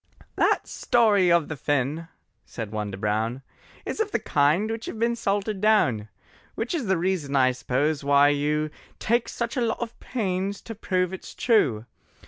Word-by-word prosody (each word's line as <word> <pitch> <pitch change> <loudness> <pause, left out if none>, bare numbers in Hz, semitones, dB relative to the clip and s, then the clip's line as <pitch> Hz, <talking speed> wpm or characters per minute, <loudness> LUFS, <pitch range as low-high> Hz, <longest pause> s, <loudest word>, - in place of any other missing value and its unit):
"That - - +2
story 205 -7 +3
of 170 -3 +3
the 155 - -4
Finn," 145 +3 -1 0.4
said 110 -3 -7
one 105 -2 -3
to 95 - -6
Brown, 110 +5 -1 0.4
"Is - - -4
of 440 -2 +1
the - - 0
kind 155 +10 +2
which 225 0 -5
hev - - -5
been 235 +1 +1
salted 205 -2 -1
down, 130 - +2 0.5
Which 225 +7 -3
is 290 -10 -2
the 190 -1 +2
reason, 165 -5 -1
I 130 -1 +4
suppose, 140 +4 -1
why 140 0 +5
you 150 +1 0 0.3
Take 235 +1 0
such 235 +2 -3
a - - +1
lot 230 -1 0
of 235 -1 -6
pains 195 -4 -2
to 225 - -7
prove 185 -3 -1
it's 190 - -8
true. 135 - +2
175 Hz, 175 wpm, -25 LUFS, 140-220 Hz, 0.5 s, why